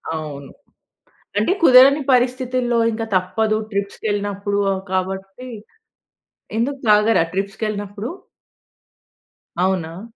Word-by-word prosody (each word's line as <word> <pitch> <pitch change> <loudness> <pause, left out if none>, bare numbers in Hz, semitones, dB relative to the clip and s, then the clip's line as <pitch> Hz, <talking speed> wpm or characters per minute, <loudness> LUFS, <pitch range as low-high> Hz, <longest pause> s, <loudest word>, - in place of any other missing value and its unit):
అవును. 145 -3 -7 0.9
అంటే 215 - +2
కుదరని 270 +2 +7
పరిస్థితుల్లో 250 -1 +1
ఇంకా 225 0 -3
తప్పదు 215 +4 +1
ట్రిప్స్‌కేళ్ళినప్పుడు 200 0 -2
అవు 190 0 -2
కాబట్టి 190 +5 -4 1.1
ఎందుకు 275 +4 -1
తాగరా 210 -3 +4
ట్రిప్స్‌కేళ్ళినప్పుడు? 205 +2 -4 1.5
అవునా? 180 -2 -1
205 Hz, 75 wpm, -20 LUFS, 190-240 Hz, 1.5 s, కుదరని